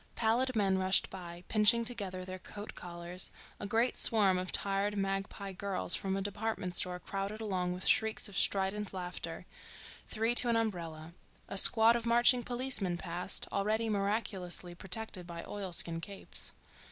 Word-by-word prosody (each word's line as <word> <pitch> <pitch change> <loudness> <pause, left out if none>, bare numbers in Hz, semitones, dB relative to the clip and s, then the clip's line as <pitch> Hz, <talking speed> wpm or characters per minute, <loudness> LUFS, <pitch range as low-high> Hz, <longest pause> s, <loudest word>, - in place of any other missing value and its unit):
Pallid 240 +3 +1
men 195 -3 +2
rushed 190 0 +3
by, 175 -2 -8
pinching 230 +2 +4
together 195 -6 -1
their 185 0 -7
coat 205 +3 -8
collars; 175 +1 -3 0.3
a 205 - -4
great 230 +4 +2
swarm 200 -5 +5
of 185 0 -4
tired, 200 +1 0
magpie 195 0 -3
girls 190 -1 0
from 195 0 0
a 195 - -2
department 205 -2 -3
store 180 0 -1
crowded 195 +3 -4
along 185 -5 -2
with 180 +1 -4
shrieks 220 0 +3
of 200 - -10
strident 195 +1 0
laughter, 180 -2 -5 0.6
three 225 +2 0
to 245 0 +3
an 230 - +3
umbrella; 170 -7 -3 0.3
a - - -6
squad 225 +3 +6
of 235 0 -2
marching 240 +2 +5
policemen 240 -8 0
passed, 175 +2 0
already 215 +3 0
miraculously 195 -4 -2
protected 185 0 -4
by 170 -1 -7
oilskin 175 -4 0
capes. 200 +2 -4
195 Hz, 155 wpm, -32 LUFS, 180-220 Hz, 0.6 s, squad